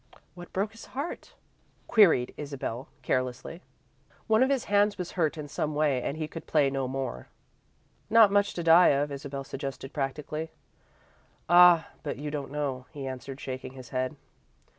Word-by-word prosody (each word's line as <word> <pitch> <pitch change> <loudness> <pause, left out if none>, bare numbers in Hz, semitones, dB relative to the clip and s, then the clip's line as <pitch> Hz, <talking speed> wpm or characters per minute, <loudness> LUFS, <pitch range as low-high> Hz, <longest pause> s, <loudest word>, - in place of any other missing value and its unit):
"What 175 -1 -11
broke 200 +3 -1
his 225 0 -12
heart?" 290 +5 -5 0.5
queried 175 - +4
Isabel, 140 -4 -5 0.2
carelessly. 130 +7 -2 0.6
"One 220 0 +3
of 260 - +4
his 275 -3 +1
hands 205 0 +2
was 180 -2 -5
hurt 165 -3 0
in 150 -1 -6
some 150 +1 -3
way, 145 -4 +2
and 140 - -3
he 155 -1 -3
could 165 0 -9
play 145 -3 +3
no 135 -1 -1
more." 130 - -4 0.8
"Not 220 -2 +7
much 205 0 +2
to 170 - -3
die 165 +2 +7
of," 145 +1 +2
Isabel 140 0 -5
suggested, 135 0 -6
practically. 150 +3 -3 1.0
"Ah, 175 -1 +7
but 145 - -4
you 145 +1 -5
don't 145 -2 -4
know," 135 -3 -3
he 140 -3 -7
answered, 130 +1 -6
shaking 130 0 -6
his 130 -3 -11
head. 130 +3 -2
150 Hz, 160 wpm, -28 LUFS, 135-175 Hz, 1.0 s, Not